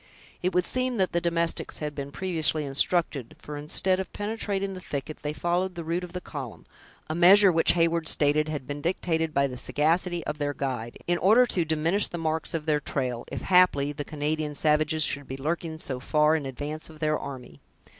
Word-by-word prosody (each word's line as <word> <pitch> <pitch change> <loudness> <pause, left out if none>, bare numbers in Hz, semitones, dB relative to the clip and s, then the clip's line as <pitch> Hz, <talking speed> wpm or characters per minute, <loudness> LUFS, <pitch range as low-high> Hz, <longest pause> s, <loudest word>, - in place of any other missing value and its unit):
It 185 - 0
would 180 -1 +3
seem 255 -1 0
that 190 -2 +1
the 170 - 0
domestics 170 -1 -1
had 150 -1 -4
been 140 -1 -6
previously 160 -3 +1
instructed; 140 -2 +1
for, 150 - -8
instead 170 +6 +1
of 190 - -5
penetrating 205 -2 -2
the 185 - -8
thicket, 150 -2 -5
they 150 - -2
followed 175 +3 -1
the 170 - -5
route 170 +3 -2
of 175 -1 -9
the 180 - -3
column; 140 -9 -8 0.4
a 155 - -3
measure 185 +4 +7
which 165 -1 +5
Heyward 165 -1 +1
stated 150 +1 +2
had 145 -4 -4
been 145 +2 -5
dictated 165 -1 -1
by 140 -1 +2
the 130 -2 -5
sagacity 165 +6 +1
of 150 - -4
their 145 -1 -2
guide, 125 -4 -4
in 175 0 0
order 220 +6 +5
to 180 -7 -1
diminish 160 +6 +1
the 175 - -6
marks 160 0 -2
of 155 -2 -3
their 150 -2 +2
trail, 125 -4 -3
if, - - -4
haply, 180 -6 +4
the 145 0 -5
Canadian 150 0 -3
savages 155 +1 +2
should 145 -2 -1
be 135 - -6
lurking 160 +3 -3
so 130 -5 -4
far 150 +3 +2
in 145 -4 -2
advance 145 +5 -5
of 155 - -13
their 155 0 0
army. 125 - -9
155 Hz, 205 wpm, -26 LUFS, 145-175 Hz, 0.4 s, measure